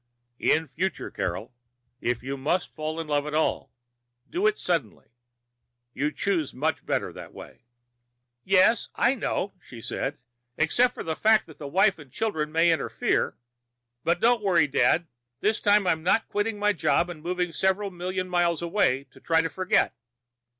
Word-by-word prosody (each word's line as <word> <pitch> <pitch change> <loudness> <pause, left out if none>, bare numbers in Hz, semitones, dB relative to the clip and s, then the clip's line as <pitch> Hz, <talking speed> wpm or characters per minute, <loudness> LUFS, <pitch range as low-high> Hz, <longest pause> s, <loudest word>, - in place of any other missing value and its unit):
In 160 - +2
future, 185 +3 -3
Carol, 115 +4 -4 0.5
if 120 -1 -1
you 135 +1 -3
must 155 +7 -1
fall 155 +1 -4
in 165 - -3
love 145 -1 0
at 150 - -3
all, 160 - 0 0.6
do 375 +5 +1
it 420 - +1
suddenly. 160 - -2 0.8
You 150 +2 -1
choose 170 -5 -1
much 155 +5 -1
better - - -1
that - - -11
way." - - -12 0.8
"Yes, 195 +4 +4
I 245 - +3
know," 210 -5 -2
she 120 - -12
said. 135 +5 -3 0.4
"Except 245 +10 +2
for - - -5
the 160 -1 -2
fact 220 +3 +4
that 160 - -15
the 145 - -6
wife 190 +4 +3
and 145 -4 -13
children 160 - -2
may 165 +2 +4
interfere. 165 - 0 0.7
But 170 +1 +1
don't 235 +1 +3
worry, 180 -6 +4
Dad. 155 +4 +2 0.3
This 215 +6 +1
time 205 -1 +4
I'm 160 -3 +1
not 185 +7 +2
quitting 205 +1 -1
my 210 0 +2
job 160 -1 +2
and 170 -3 -8
moving 180 +1 -1
several 190 +3 0
million 185 +1 -3
miles 175 -2 +1
away 165 -7 +1
to - - -17
try 165 -1 +2
to 165 - -1
forget." 185 0 +1
170 Hz, 165 wpm, -26 LUFS, 155-200 Hz, 0.8 s, Yes